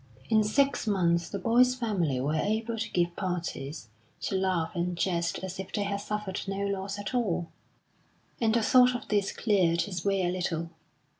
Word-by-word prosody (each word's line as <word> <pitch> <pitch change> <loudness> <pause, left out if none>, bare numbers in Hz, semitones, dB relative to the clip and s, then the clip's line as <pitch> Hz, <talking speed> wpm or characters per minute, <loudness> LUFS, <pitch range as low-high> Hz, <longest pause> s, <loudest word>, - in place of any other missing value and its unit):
In 220 -1 +5
six 275 +4 +1
months 170 -4 +2
the 200 - -3
boy's 245 +6 +4
family 190 - 0
were 140 +4 0
able 220 +7 0
to 225 0 -3
give 175 -2 0
parties, 165 - -4 0.3
to - - -2
laugh 185 -4 0
and 175 0 -2
jest 170 -2 0
as 190 0 -5
if 190 - -6
they 205 - -1
had 200 0 -1
suffered 210 -2 -3
no 195 +1 -2
loss 195 0 -3
at 205 +4 -5
all; 180 -9 0 0.9
and 225 -1 +3
the 230 - +2
thought 250 +2 +6
of 245 - -5
this 205 -2 +1
cleared 180 -6 +2
his 180 -4 -5
way 195 -1 +1
a - - +1
little. 170 -2 -2
195 Hz, 180 wpm, -29 LUFS, 175-215 Hz, 0.9 s, thought